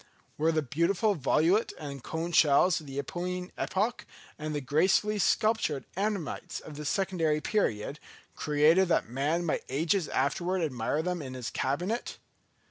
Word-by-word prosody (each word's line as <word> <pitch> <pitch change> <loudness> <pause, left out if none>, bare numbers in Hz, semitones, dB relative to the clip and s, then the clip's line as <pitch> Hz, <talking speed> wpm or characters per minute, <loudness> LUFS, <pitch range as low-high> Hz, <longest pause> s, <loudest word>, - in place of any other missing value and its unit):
Were 160 +2 +2
the 155 -1 0
beautiful 170 - +1
volute 170 - +2
and 140 -4 -7
cone 165 +2 -3
shells 160 +2 +4
of 150 - -13
the 135 - -8
Eocene 180 +4 -4
epoch, 210 +5 -1 0.3
and 155 0 -4
the - - 0
gracefully 190 +9 +2
sculptured 210 -9 +1
ammonites 195 -5 -2
of 155 - -10
the 150 +1 -6
Secondary 165 -3 +1
period, 150 - -1 0.4
created 155 +5 +4
that 170 - +1
man 145 +8 -1
might 160 - -1
ages 160 +6 +1
afterwards 175 +7 0
admire 140 +2 -1
them 180 -1 -2
in 130 -2 -7
his 125 -2 -5
cabinet? 180 - -2
160 Hz, 145 wpm, -29 LUFS, 145-185 Hz, 0.4 s, shells